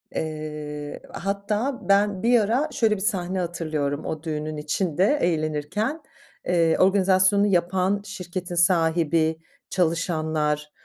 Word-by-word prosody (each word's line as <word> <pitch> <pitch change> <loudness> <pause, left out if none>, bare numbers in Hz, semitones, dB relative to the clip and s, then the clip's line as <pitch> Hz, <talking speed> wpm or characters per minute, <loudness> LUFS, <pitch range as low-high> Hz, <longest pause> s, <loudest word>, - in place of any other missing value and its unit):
Eee, 150 -1 -5
hatta 205 +6 -2
ben 200 0 +3
bir 240 0 +5
ara 245 +9 +1
şöyle 220 -5 +2
bir 190 - -7
sahne 190 -3 -1
hatırlıyorum, 155 -4 -2
o 155 0 -4
düğünün 155 -1 -4
içinde 180 - +1
eğlenirken. 165 - -1 0.5
Eee, 170 -2 +3
organizasyonu 190 +1 +4
yapan 190 +2 +1
şirketin 180 -2 -6
sahibi, 165 -2 +2 0.3
çalışanlar, 155 -4 0
175 Hz, 105 wpm, -24 LUFS, 155-200 Hz, 0.5 s, bir